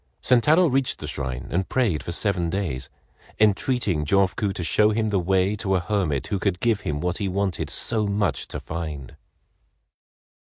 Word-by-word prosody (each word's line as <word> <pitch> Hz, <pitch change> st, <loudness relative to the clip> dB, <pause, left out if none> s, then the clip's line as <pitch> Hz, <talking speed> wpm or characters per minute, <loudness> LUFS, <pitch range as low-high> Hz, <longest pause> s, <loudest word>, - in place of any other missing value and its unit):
Sentaro 150 Hz, +8 st, +4 dB
reached 135 Hz, -4 st, +1 dB
the -, -, -7 dB
shrine 65 Hz, -4 st, -4 dB
and 95 Hz, +2 st, -1 dB
prayed 115 Hz, -12 st, +1 dB
for -, -, -5 dB
seven 90 Hz, -2 st, 0 dB
days, 85 Hz, -8 st, -3 dB, 0.5 s
entreating 105 Hz, -, +2 dB
Jofuku 100 Hz, +4 st, +1 dB
to 90 Hz, -, -4 dB
show 105 Hz, +5 st, +3 dB
him 110 Hz, 0 st, 0 dB
the 100 Hz, -2 st, +1 dB
way 95 Hz, +3 st, +1 dB
to 95 Hz, -2 st, 0 dB
a -, -, +2 dB
hermit 85 Hz, -7 st, -1 dB
who 100 Hz, -3 st, -2 dB
could 95 Hz, -3 st, -1 dB
give 110 Hz, 0 st, +1 dB
him 75 Hz, -4 st, -3 dB
what 90 Hz, +2 st, -2 dB
he 100 Hz, -2 st, -1 dB
wanted 95 Hz, -3 st, -2 dB
so 110 Hz, -3 st, +1 dB
much 100 Hz, -8 st, 0 dB
to -, -, -5 dB
find. 80 Hz, -5 st, -6 dB
95 Hz, 170 wpm, -24 LUFS, 85-105 Hz, 0.5 s, Sentaro